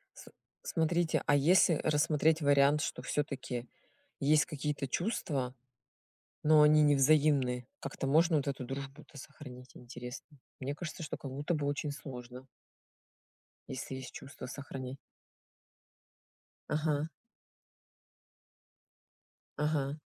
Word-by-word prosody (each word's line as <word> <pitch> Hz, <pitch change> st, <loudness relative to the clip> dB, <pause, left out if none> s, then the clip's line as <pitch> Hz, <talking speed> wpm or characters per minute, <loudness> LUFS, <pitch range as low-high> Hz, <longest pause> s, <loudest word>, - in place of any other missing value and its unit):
Сл -, -, -13 dB, 0.3 s
смотрите, 165 Hz, 0 st, +1 dB
а 145 Hz, -, +5 dB
если 165 Hz, +4 st, +5 dB
рассмотреть 155 Hz, +1 st, +2 dB
вариант, 145 Hz, +1 st, +4 dB
что 125 Hz, -, -3 dB
всё-таки 125 Hz, -3 st, -3 dB, 0.5 s
есть 145 Hz, 0 st, +4 dB
какие-то 150 Hz, -2 st, -3 dB
чувства, 140 Hz, -, -2 dB, 0.9 s
но 155 Hz, 0 st, +7 dB
они 150 Hz, 0 st, +6 dB
не 145 Hz, -1 st, +5 dB
взаимны, 135 Hz, -4 st, +3 dB
как-то 135 Hz, 0 st, -4 dB
можно 160 Hz, +3 st, +4 dB
вот 145 Hz, -, 0 dB
эту 135 Hz, -2 st, -3 dB
дружбу-то 140 Hz, +3 st, -8 dB
сохранить, 130 Hz, -2 st, -11 dB
интересно? 125 Hz, +4 st, -9 dB, 0.2 s
Мне 140 Hz, +2 st, -3 dB
кажется, 170 Hz, +1 st, -6 dB
что 150 Hz, -, -4 dB
как 135 Hz, -, -7 dB
будто 145 Hz, +5 st, -1 dB
бы 145 Hz, -2 st, -1 dB
очень 145 Hz, +1 st, -1 dB
сложно. 125 Hz, -2 st, -9 dB, 1.2 s
Если 130 Hz, +1 st, -5 dB
есть 130 Hz, -1 st, -8 dB
чувства- 135 Hz, -, -9 dB
сохрани. 135 Hz, -1 st, -7 dB, 1.7 s
Ага. 150 Hz, 0 st, 0 dB, 2.5 s
Ага. 150 Hz, -2 st, 0 dB
145 Hz, 110 wpm, -32 LUFS, 135-155 Hz, 2.5 s, но